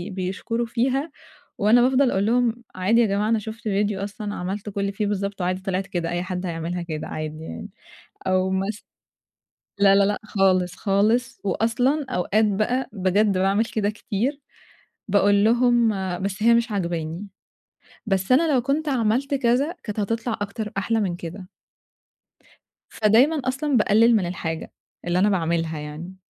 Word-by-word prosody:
بيشكروا 195 Hz, +6 st, -2 dB
فيها 265 Hz, +6 st, -1 dB, 0.5 s
وأنا 220 Hz, +4 st, +5 dB
بافضل 260 Hz, +1 st, +3 dB
أقول 195 Hz, +1 st, +1 dB
لهم 240 Hz, +1 st, +1 dB
عادي 210 Hz, +6 st, +3 dB
يا -, -, +4 dB
جماعة، 205 Hz, +2 st, 0 dB
أنا 225 Hz, -1 st, +2 dB
شُفت 220 Hz, +2 st, -8 dB
فيديو 205 Hz, -1 st, 0 dB
أصلًا 205 Hz, 0 st, -5 dB
عملت 195 Hz, +3 st, -4 dB
كل 200 Hz, 0 st, -3 dB
اللي 200 Hz, 0 st, -1 dB
فيه 205 Hz, +1 st, -2 dB
بالضبط 200 Hz, -1 st, -3 dB
وعادي 185 Hz, +1 st, -1 dB
طِلعِت 190 Hz, 0 st, -2 dB
كده، 175 Hz, -3 st, -3 dB
أي 175 Hz, +1 st, -2 dB
حد 185 Hz, 0 st, -4 dB
هيعملها 170 Hz, +1 st, -3 dB
كده 155 Hz, -3 st, -5 dB
عادي 155 Hz, 0 st, -5 dB
يعني، 80 Hz, -, -7 dB, 0.6 s
أو 185 Hz, 0 st, +2 dB
مث 195 Hz, +3 st, -1 dB, 1.0 s
لا 195 Hz, -1 st, +6 dB
لا 200 Hz, 0 st, +5 dB
لأ 205 Hz, +1 st, 0 dB
خالص 185 Hz, -4 st, +1 dB
خالص، 220 Hz, +5 st, +1 dB
وأصلًا 245 Hz, +8 st, +1 dB
أوقات 215 Hz, +1 st, +1 dB
بقى 215 Hz, +6 st, 0 dB
بجد 195 Hz, 0 st, +1 dB
باعمل 195 Hz, +4 st, +2 dB
كده 210 Hz, -2 st, -1 dB
كتير، 230 Hz, +7 st, -3 dB, 0.7 s
باقول 200 Hz, 0 st, +3 dB
لهم 240 Hz, 0 st, +4 dB, 0.3 s
بس 200 Hz, +2 st, -3 dB
هي 235 Hz, -, +6 dB
مش 235 Hz, 0 st, +1 dB
عاجباني، 170 Hz, 0 st, -3 dB, 0.8 s
بس 195 Hz, +2 st, 0 dB
أنا 310 Hz, +4 st, +4 dB
لو 255 Hz, -, +3 dB
كنت 290 Hz, +4 st, -1 dB
عملت 255 Hz, +3 st, 0 dB
كذا، 270 Hz, +6 st, +1 dB
كانت 210 Hz, -1 st, -4 dB
هتطلع 230 Hz, +3 st, -2 dB
أكتر 210 Hz, +1 st, -4 dB
أحلى 225 Hz, +3 st, 0 dB
من 185 Hz, -4 st, -1 dB
كده. 175 Hz, +2 st, -8 dB, 1.4 s
فدايمًا 250 Hz, +8 st, +3 dB
أصلًا 265 Hz, +1 st, 0 dB
باقلِّل 225 Hz, +2 st, +4 dB
من 195 Hz, -, +1 dB
الحاجة 165 Hz, -2 st, -4 dB, 0.4 s
اللي 175 Hz, +1 st, +1 dB
أنا 205 Hz, +3 st, +4 dB
باعملها 165 Hz, -3 st, -1 dB
يعني، 155 Hz, +5 st, -8 dB
205 Hz, 155 wpm, -23 LUFS, 185-235 Hz, 1.4 s, لا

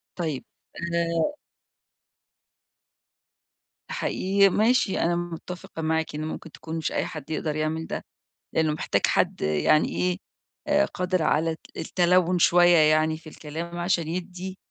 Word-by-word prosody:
طيب، 160 Hz, -6 st, -3 dB, 0.3 s
آآ 170 Hz, -, 0 dB, 2.6 s
حقيقي، 195 Hz, +1 st, +2 dB
ماشي، 220 Hz, 0 st, +2 dB
أنا 170 Hz, +1 st, +2 dB
متّفقة 175 Hz, -1 st, -6 dB
معاكِ 160 Hz, -1 st, -1 dB
إن 155 Hz, +1 st, -3 dB
ممكن 160 Hz, +1 st, -6 dB
تكون 160 Hz, +2 st, -6 dB
مش 160 Hz, -, -2 dB
أي -, -, 0 dB
حد 155 Hz, -1 st, -8 dB
يقدر 155 Hz, -1 st, -2 dB
يعمل 155 Hz, +1 st, -2 dB
ده، -, -, -5 dB, 0.5 s
لإنّه 160 Hz, -1 st, +2 dB
محتاج -, -, 0 dB
حد -, -, +1 dB
يعني 75 Hz, -, +3 dB
إيه، 180 Hz, 0 st, 0 dB, 0.5 s
آآ 295 Hz, +1 st, +4 dB
قادر 180 Hz, -2 st, -1 dB
على 160 Hz, +2 st, +2 dB
الت 160 Hz, -, -6 dB, 0.2 s
التَلوُّن 180 Hz, 0 st, +2 dB
شوية 175 Hz, 0 st, +6 dB
يعني 155 Hz, 0 st, +4 dB
في 160 Hz, -1 st, -12 dB
الكلام 165 Hz, +3 st, -7 dB
عشان 175 Hz, -2 st, 0 dB
يِدّي 185 Hz, +2 st, -5 dB
170 Hz, 130 wpm, -26 LUFS, 155-180 Hz, 2.6 s, شوية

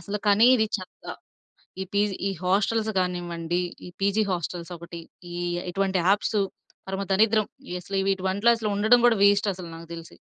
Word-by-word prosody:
అసలు 210 Hz, 0 st, -4 dB
కానీ, 205 Hz, +3 st, +6 dB
ఇది 220 Hz, -3 st, +2 dB
చెత్త. 185 Hz, -2 st, -12 dB, 0.8 s
ఈ -, -, 0 dB
పీజీ 205 Hz, -1 st, +1 dB
ఈ -, -, 0 dB
హాస్టల్స్ 210 Hz, +4 st, +1 dB
కానివ్వండి, 175 Hz, -1 st, -2 dB, 0.3 s
ఈ -, -, -8 dB
పీజీ 200 Hz, +2 st, +2 dB
హాస్టల్స్ 175 Hz, 0 st, -4 dB
ఒకటి. 170 Hz, 0 st, -9 dB, 0.3 s
ఇ -, -, -7 dB, 0.4 s
ఇటువంటి 195 Hz, 0 st, 0 dB
యాప్సు 205 Hz, +1 st, +2 dB, 0.5 s
పరమ 190 Hz, +1 st, -3 dB
దరిద్రం. 215 Hz, +2 st, +3 dB, 0.2 s
ఈ -, -, -7 dB
అసలు 195 Hz, +2 st, -2 dB
వీటివంట్లోసల 200 Hz, +4 st, +1 dB
ఉండడం 220 Hz, +4 st, +5 dB
కూడా 230 Hz, -2 st, +3 dB
వేస్ట్ 200 Hz, 0 st, +4 dB
అసలు, 180 Hz, -1 st, -9 dB
నాకు 165 Hz, 0 st, -11 dB
తెలిసి. 165 Hz, 0 st, -10 dB
195 Hz, 155 wpm, -25 LUFS, 180-210 Hz, 0.8 s, కానీ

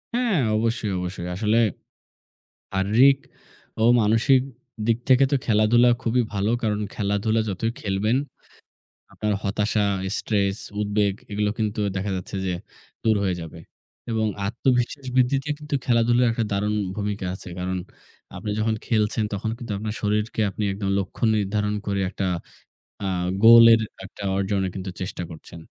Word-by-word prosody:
হ্যাঁ, 240 Hz, -8 st, +2 dB, 0.2 s
অবশ্যই, 110 Hz, -2 st, -1 dB
অবশ্যই। 90 Hz, -1 st, -5 dB
আসলে 110 Hz, +3 st, +2 dB, 1.2 s
শারীরিক 120 Hz, +8 st, +5 dB, 0.6 s
ও -, -, +2 dB, 0.2 s
মানসিক 115 Hz, +5 st, +4 dB, 0.5 s
দিক 115 Hz, -1 st, +2 dB
থেকে 130 Hz, +1 st, +6 dB
তো -, -, +5 dB
খেলাধুলা 115 Hz, +2 st, +4 dB
খুবই 120 Hz, +2 st, +2 dB
ভালো। 100 Hz, +2 st, 0 dB
কারণ 105 Hz, -2 st, 0 dB
খেলাধুলা 105 Hz, +1 st, 0 dB
যতই 105 Hz, +4 st, -1 dB
খেলবেন, 105 Hz, +4 st, 0 dB, 1.0 s
আপনার 105 Hz, -1 st, -1 dB
হতাশা, 105 Hz, +1 st, 0 dB, 0.3 s
স্ট্রেস, 100 Hz, -2 st, 0 dB, 0.2 s
উদ্বেগ 105 Hz, -1 st, +1 dB, 0.2 s
এগুলো 105 Hz, 0 st, 0 dB
কিন্তু 110 Hz, -1 st, -1 dB, 0.2 s
দেখা 95 Hz, +2 st, -2 dB
যাচ্ছে 90 Hz, +2 st, -6 dB
যে 90 Hz, -, 0 dB, 0.5 s
দূর 110 Hz, -1 st, +4 dB
হয়ে 95 Hz, -2 st, +1 dB
যাবে। 80 Hz, 0 st, -9 dB, 0.5 s
এবং 110 Hz, -1 st, +1 dB, 0.2 s
আত্মবিশ্বাস 125 Hz, +4 st, 0 dB
বৃদ্ধিতেও 135 Hz, +3 st, +2 dB
কিন্তু 150 Hz, -1 st, -5 dB
খেলাধুলার 120 Hz, 0 st, +3 dB
একটা 115 Hz, 0 st, -1 dB
দারুণ 105 Hz, +1 st, 0 dB, 0.2 s
ভূমিকা 105 Hz, -2 st, -3 dB
আছে। 95 Hz, -, -9 dB
কারণ 90 Hz, +1 st, -2 dB, 0.6 s
আপনি 105 Hz, -, -4 dB
যখন 110 Hz, +1 st, +1 dB
খেলছেন, 110 Hz, -1 st, +1 dB
তখন 105 Hz, +2 st, -2 dB
কিন্তু 115 Hz, -3 st, -6 dB
আপনার 105 Hz, +1 st, -4 dB
শরীরকে 105 Hz, +2 st, -1 dB
আপনি 105 Hz, -, -3 dB
একদম 100 Hz, 0 st, -3 dB
লক্ষ্য 95 Hz, +4 st, -5 dB
নির্ধারণ 105 Hz, 0 st, 0 dB
করে 100 Hz, -1 st, 0 dB
একটা 95 Hz, -1 st, -3 dB, 0.8 s
আ -, -, 0 dB, 0.3 s
গোলের 115 Hz, 0 st, +9 dB, 0.2 s
একটা 100 Hz, -, -10 dB
অর্জনে 100 Hz, 0 st, 0 dB
কিন্তু 95 Hz, 0 st, -5 dB
চেষ্টা 90 Hz, -1 st, -4 dB
করছেন। 80 Hz, +1 st, -11 dB
105 Hz, 140 wpm, -24 LUFS, 100-115 Hz, 1.2 s, গোলের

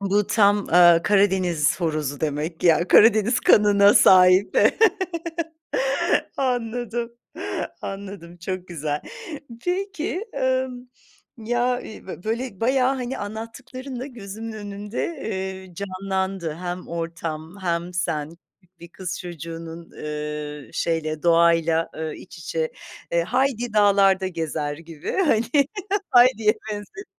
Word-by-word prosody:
bu 200 Hz, +1 st, +1 dB
tam, 205 Hz, -1 st, +3 dB
ııı, 175 Hz, -1 st, +6 dB
Karadeniz 185 Hz, -6 st, +2 dB
horozu 150 Hz, -4 st, -2 dB
demek 155 Hz, +2 st, -2 dB
ki -, -, +1 dB
ya, 170 Hz, +2 st, +4 dB
Karadeniz 225 Hz, +2 st, +5 dB
kanına 205 Hz, -1 st, +6 dB
sahip. 185 Hz, +1 st, +6 dB, 1.8 s
Anladım, 240 Hz, -2 st, -2 dB, 0.7 s
anladım, 195 Hz, -3 st, -7 dB
çok 185 Hz, +1 st, -5 dB
güzel. 150 Hz, -3 st, -3 dB, 0.6 s
Peki, 375 Hz, +1 st, -2 dB
emm, 260 Hz, -2 st, -1 dB, 0.6 s
ya, 240 Hz, +2 st, 0 dB
ııı, 220 Hz, -5 st, -8 dB
bö 185 Hz, -, -8 dB
böyle 230 Hz, -2 st, -3 dB
bayağı 260 Hz, +2 st, +2 dB
hani, 255 Hz, 0 st, -4 dB
anlattıklarınla 250 Hz, +5 st, -7 dB
gözümün 225 Hz, -2 st, -8 dB
önünde, 205 Hz, 0 st, -5 dB
eee, 190 Hz, -, -5 dB
canlandı. 190 Hz, -3 st, -3 dB
Hem 180 Hz, +1 st, -6 dB
ortam 165 Hz, 0 st, -5 dB
hem 170 Hz, 0 st, -1 dB
sen, 165 Hz, -2 st, -2 dB, 0.4 s
bir 170 Hz, -, -11 dB
kız 180 Hz, +1 st, -6 dB
çocuğunun, 165 Hz, -1 st, -8 dB
ııı, 150 Hz, -1 st, -6 dB
şeyle, 155 Hz, -2 st, -2 dB
doğayla, 165 Hz, -1 st, +3 dB
ııı, 160 Hz, 0 st, -4 dB
iç 175 Hz, -, -12 dB
içe, 160 Hz, 0 st, -3 dB, 0.4 s
eee, 170 Hz, 0 st, +2 dB
Heidi 245 Hz, 0 st, 0 dB
dağlarda 195 Hz, -2 st, +4 dB
gezer 160 Hz, -4 st, -3 dB
gibi 165 Hz, -2 st, -7 dB
hani, 290 Hz, -, +2 dB, 0.7 s
Heidi'ye 240 Hz, -3 st, +6 dB, 0.2 s
benziyor. 210 Hz, -, -7 dB
190 Hz, 110 wpm, -23 LUFS, 165-225 Hz, 1.8 s, ııı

